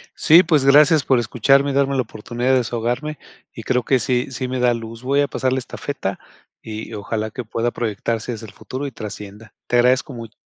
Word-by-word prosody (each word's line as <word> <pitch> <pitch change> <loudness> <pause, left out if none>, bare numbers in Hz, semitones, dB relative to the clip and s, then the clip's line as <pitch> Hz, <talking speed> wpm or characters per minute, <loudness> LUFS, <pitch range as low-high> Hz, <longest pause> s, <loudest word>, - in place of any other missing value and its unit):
Sí, 165 +4 +6
pues 155 -5 +2
gracias 150 +2 +6
por 130 -2 +3
escucharme 135 +4 +2
y - - -3
darme 140 0 +1
la 130 - +2
oportunidad 120 +2 -3
de 130 - +5
desahogarme 125 +5 -2 0.4
y - - -9
creo 125 -1 0
que 130 +1 +2
sí 125 +1 0
sí 130 0 -3
me 130 0 -3
da 125 -1 +3
luz. 115 0 -7
Voy 140 +2 +2
a 145 - +1
pasar 130 -2 -1
la 130 - 0
estafeta 125 -6 -5 0.4
y 110 +1 -7
ojalá 110 +1 -3
que 125 - -6
pueda 115 +2 -1
proyectarse 115 +1 -3
hacia 110 0 -8
el 100 - -14
futuro 135 +2 -6
y - - -7
trascienda. 105 -1 -9
Te 120 - +2
agradezco 125 +2 +3
mui. 115 -1 -10
125 Hz, 210 wpm, -20 LUFS, 115-135 Hz, 0.4 s, Sí